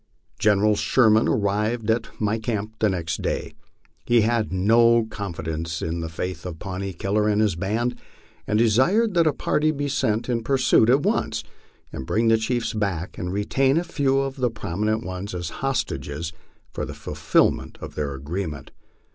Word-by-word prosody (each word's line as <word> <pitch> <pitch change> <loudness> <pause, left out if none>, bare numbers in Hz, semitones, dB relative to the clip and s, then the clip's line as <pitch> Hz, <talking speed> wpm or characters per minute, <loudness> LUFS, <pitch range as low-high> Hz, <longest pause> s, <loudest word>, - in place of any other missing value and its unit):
General 105 0 +3
Sherman 110 -1 +4
arrived 105 +1 0
at 115 - 0
my 110 +1 0
camp 110 -1 -3
next 85 -6 0
day. - - -2 0.5
He 120 -1 +4
had 110 -1 +1
no 115 +5 +4
confidence 85 -6 -4
in 85 +1 -2
the 80 -1 -4
faith 85 +1 -5
of 90 -3 -6
Pawnee 95 +2 -4
Killer 105 +5 0
and 105 0 +2
his 105 -5 +2
band, 110 +7 -1 0.5
and 105 - +1
desired 130 - +3
that 170 -2 +4
a - - +4
party 150 +2 0
be 145 -2 -1
sent 115 -5 0
in 120 -2 0
pursuit 130 -2 +3
at 135 +3 +4
once, 145 - 0 0.5
and 65 - -6
bring 115 +1 +2
the 115 - +5
chiefs 120 +1 -1
back 95 -5 -3
and 90 0 -3
retain 130 +8 +1
a 170 - +2
few 140 -6 0
of 135 0 -1
the 125 -2 +1
prominent 110 +1 -2
ones 95 +1 -5
as 85 -2 -4
hostages 80 - -2 0.4
for - - -4
the - - -6
fulfilment - - 0
of - - -8
their 70 -2 -3
agreement. 75 +1 -5
105 Hz, 165 wpm, -24 LUFS, 90-120 Hz, 0.5 s, the